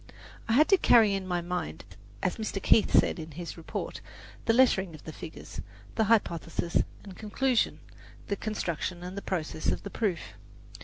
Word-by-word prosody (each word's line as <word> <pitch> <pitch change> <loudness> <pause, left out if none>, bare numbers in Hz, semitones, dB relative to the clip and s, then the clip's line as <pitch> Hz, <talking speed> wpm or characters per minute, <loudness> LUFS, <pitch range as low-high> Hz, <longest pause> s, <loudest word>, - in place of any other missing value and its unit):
I - - +3
had 300 +6 +6
to 390 - +7
carry 225 - +6
in 195 -1 -2
my 175 -1 0
mind, 175 - -4 0.4
as 180 - 0
Mr. 215 -3 -3
Keith 210 +2 +4
says - - +4
in 160 -1 -7
his 170 +2 -6
report, 165 - -5 0.4
the - - +4
lettering 195 -8 +3
of 155 - -14
the 160 - -8
figures, 160 +1 -8 0.3
the 220 - +2
hypothesis 170 -6 +1 0.3
and 195 -3 -10
conclusion, 240 +3 0 0.4
the 200 - -1
construction 180 -4 -3
and 180 +1 -6
the 200 - -4
process 160 -5 -3
of - - 0
the 200 - -6
proof. 200 -7 0
190 Hz, 170 wpm, -29 LUFS, 170-220 Hz, 0.4 s, to